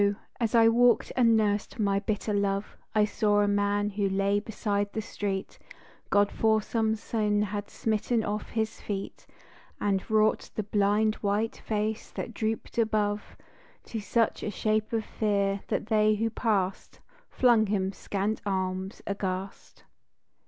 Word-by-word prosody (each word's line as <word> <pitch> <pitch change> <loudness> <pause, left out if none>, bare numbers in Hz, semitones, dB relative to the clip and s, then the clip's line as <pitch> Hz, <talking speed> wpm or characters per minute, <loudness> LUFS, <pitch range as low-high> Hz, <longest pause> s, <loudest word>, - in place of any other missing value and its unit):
as 230 -1 0
I 225 -1 +7
walked 240 +1 +4
and 230 -3 +5
nursed 210 -1 0
my 200 -3 +2
bitter 210 +1 -2
love 200 0 -1 0.2
I 210 -1 +5
saw 210 -1 +2
a 205 - +2
man 205 0 +1
who 200 0 0
lay 195 +1 +1
beside 205 -1 -2
the 220 - -2
street, 200 -2 -4 0.5
God 205 0 +3
for 220 -1 +3
some 220 0 0
sin 210 -1 0
had 205 0 -4
smitten 220 +1 0
off 210 0 -3
his 220 -1 -2
feet 195 -2 -5 0.5
And 195 -2 +1
wrought 215 0 +2
the 215 - -1
blind, 205 +1 +2
white 210 +2 0
face 215 0 -2
that 235 - -5
drooped 220 +2 -3
above 210 -2 0 0.5
To 225 - -5
such 225 +2 0
a - - -2
shape 215 +1 0
of 225 -2 -1
fear, 200 -2 0
that - - -1
they 215 -1 +3
who 225 +2 -1
passed 200 -5 -1 0.3
Flung 235 -4 +4
him 195 -2 0
scant 200 +2 -2
alms 190 -1 -3
aghast. 195 -1 -5
210 Hz, 145 wpm, -28 LUFS, 200-220 Hz, 0.5 s, I